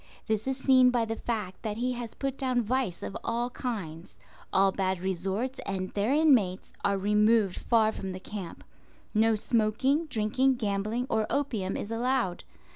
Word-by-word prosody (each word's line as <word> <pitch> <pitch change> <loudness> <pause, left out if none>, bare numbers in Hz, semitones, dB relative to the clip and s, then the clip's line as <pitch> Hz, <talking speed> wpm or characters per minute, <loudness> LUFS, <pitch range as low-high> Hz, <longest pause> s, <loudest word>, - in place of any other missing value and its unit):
This 220 +1 -1
is 265 -1 -1
seen 260 -2 +5
by 240 -2 +1
the 225 0 -3
fact 215 -6 -4
that 215 -1 -3
he 250 +2 0
has 240 -2 -6
put 270 -1 -2
down 255 -3 0
vice 240 -5 -1
of - - -5
all 240 +1 -1
kinds. 185 -11 -5 0.3
All 195 0 +4
bad 190 -1 -1
resorts 190 +8 -2
and 185 -1 -3
their 205 +4 0
inmates 260 -12 +3
are 200 0 +2
removed 210 0 +3
far 220 -2 +3
from 195 -3 -5
the 185 - -6
camp. 195 -2 -7 0.5
No 220 0 +4
smoking, 240 +8 +1
drinking, 255 +3 +1
gambling, 215 +1 -1
or 220 -3 0
opium 230 -10 -1
is 205 - -5
allowed. 235 -5 0
220 Hz, 165 wpm, -28 LUFS, 195-250 Hz, 0.5 s, seen